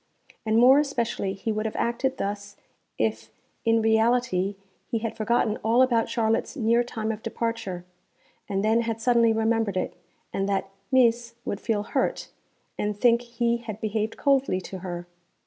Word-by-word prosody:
And 220 +1 +3
more 255 +4 +7
especially 235 -9 -1
he 200 +3 -3
would 215 +1 -1
have 215 - -6
acted 255 +3 -1
thus 200 0 -4 0.4
if 110 0 -1 0.4
in 225 -1 +3
reality 220 -3 +2 0.3
he 230 - 0
had 225 0 -3
forgotten 220 0 +1
all 230 +4 +3
about 235 -3 +2
Charlotte's 225 +4 0
near 235 0 +3
time 225 -2 -3
of 220 -1 -6
departure 225 -8 -3 0.6
and 195 0 0
then 225 +2 +3
had 225 -1 -3
suddenly 235 -1 +4
remembered 225 -3 +1
it, 185 - -2 0.4
and 195 +1 -1
that 195 -1 -1 0.2
'Mees' 235 -2 +3
would 200 - -3
feel 210 -3 0
hurt, - - -1 0.5
and 210 0 -2
think 235 0 +4
he 235 0 0
had 225 -3 -7
behaved 215 0 -2
coldly 275 -9 +2
to 190 +1 -7
her. 175 -1 -5
225 Hz, 160 wpm, -26 LUFS, 205-235 Hz, 0.6 s, more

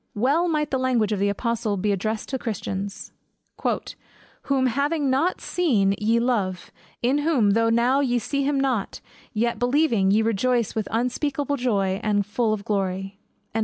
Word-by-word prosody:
Well 280 +11 +2
might 305 -3 0
the 265 - +1
language 245 -5 +1
of 210 - 0
the 200 +1 +2
apostle 225 0 -1
be 205 +2 0
addressed 215 +3 -2
to 265 - -2
Christians, 200 -3 -5 1.3
"Whom 270 -2 +1
having 280 +3 +1
not 300 +8 +1
seen 225 - +1
ye 225 +2 +2
love; 200 -7 -1 0.3
in 260 +4 +2
whom, 285 -9 +2
though 230 +2 +3
now 240 +4 +3
ye 250 -3 +1
see 280 +4 -1
him 280 0 +1
not, 255 -7 -1 0.3
yet 235 +1 -1
believing, 245 -6 +2
ye 215 +3 +3
rejoice 230 +1 +1
with 220 -3 -2
joy 225 - 0
unspeakable, 255 -2 -1 0.2
and 205 -2 +1
full 220 +2 0
of 210 -2 -3
glory." 195 -1 -2
235 Hz, 160 wpm, -24 LUFS, 205-270 Hz, 1.3 s, though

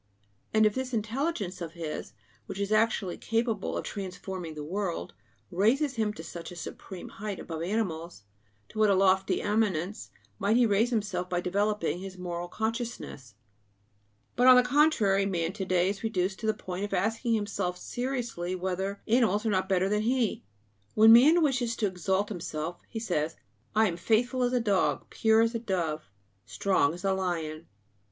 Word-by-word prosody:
And 220 0 +4
if 210 - +3
this 260 0 -3
intelligence 220 - -2
of 165 -1 -5
his, 160 -3 -6 0.3
which 195 - -6
is 200 +1 -2
actually 215 -4 +1
capable 225 -2 -1
of - - -3
transforming 185 -4 -6
the 150 - -5
world, 180 +2 -3 0.4
raises 245 - +2
him 220 -4 0
to 160 - -9
such 170 +2 -8
a - - -9
supreme 175 +1 -8
height 205 -1 -6
above 160 -1 -6
animals, 170 - -3 0.5
to 215 - -7
what 215 -1 +5
a 200 - +4
lofty 190 0 +2
eminence 205 -2 0 0.3
might 205 +4 +2
he 245 - +5
raise 215 +2 +3
himself 200 -6 -2
by 175 - 0
developing 200 -1 0
his 190 0 -8
moral 175 -1 -4
consciousness! 220 - -4 1.0
But 250 +1 +4
on 255 - +10
the 250 - +6
contrary, 250 -8 +3
man 170 -2 -1
to 195 -2 -4
day 185 0 +2
is 200 0 -4
reduced 190 -3 -1
to 220 - -3
the 215 - +2
point 185 -1 -5
of 205 -1 -2
asking 225 +5 +1
himself 200 -4 -2
seriously 240 -8 -3
whether 190 +2 -3
animals 220 -2 +3
are 220 - +2
not 190 -1 0
better 190 0 +2
than 210 +1 +1
he. 240 0 0 0.5
When 220 +1 +8
man 310 +8 +7
wishes 250 -5 +1
to 225 - 0
exalt 190 +1 0
himself, 170 -3 -5
he 230 - -6
says: 165 -7 -1 0.4
"I 220 0 +5
am 170 -3 -3
faithful 235 +7 +1
as 245 0 +1
a 250 - +3
dog, 205 -5 0
pure 220 0 +4
as 230 +1 +2
a 230 - -1
dove, 170 - -2 0.4
strong 180 -6 +1
as 180 - -10
a 195 - +3
lion." 170 -4 -3
200 Hz, 175 wpm, -29 LUFS, 180-225 Hz, 1.0 s, on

